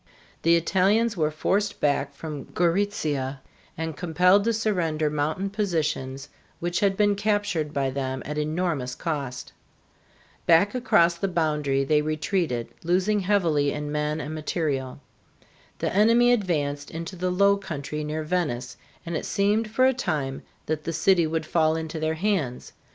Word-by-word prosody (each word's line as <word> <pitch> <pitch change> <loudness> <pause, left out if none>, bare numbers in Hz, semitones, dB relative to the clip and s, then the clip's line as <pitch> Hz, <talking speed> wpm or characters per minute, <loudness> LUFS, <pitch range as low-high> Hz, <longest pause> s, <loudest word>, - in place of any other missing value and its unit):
The 170 +1 +5
Italians 200 +7 +2
were 155 -4 +1
forced 195 +7 -1
back 140 -1 0
from 150 -1 -6
Gorizia 160 -7 0 0.4
and 160 -1 -3
compelled 180 +4 +3
to 230 - +3
surrender 170 -9 0
mountain 155 +7 -1
positions 155 -9 -2 0.3
which 175 +1 -1
had 195 -1 +2
been 205 -1 +4
captured 205 -7 0
by 135 -2 -1
them 130 -1 -3
at 150 - -4
enormous 155 -5 -1
cost. 140 -6 -4 0.9
Back 170 +5 +5
across 235 -9 +3
the 195 - -1
boundary 150 -6 0
they 150 +2 +3
retreated, 155 - -1
losing 185 +5 +2
heavily 170 -8 +2
in 150 0 -4
men 150 +1 -1
and 150 0 -5
material. 150 -4 -2 0.8
The - - -2
enemy 230 +4 +5
advanced 145 -9 -1
into 165 +3 -6
the 180 +1 -1
low 200 +2 +4
country 150 -5 -5
near 155 +1 -3
Venice, 150 -7 -2 0.3
and 170 0 -4
it - - -2
seemed 210 +2 +1
for 255 +4 +3
a 265 - +4
time 150 - -2 0.2
that 155 0 -2
the 165 - -3
city 175 0 +3
would 160 0 -2
fall 160 -1 +2
into 160 0 -4
their 155 0 0
hands. 160 -9 -2
160 Hz, 150 wpm, -25 LUFS, 150-195 Hz, 0.9 s, The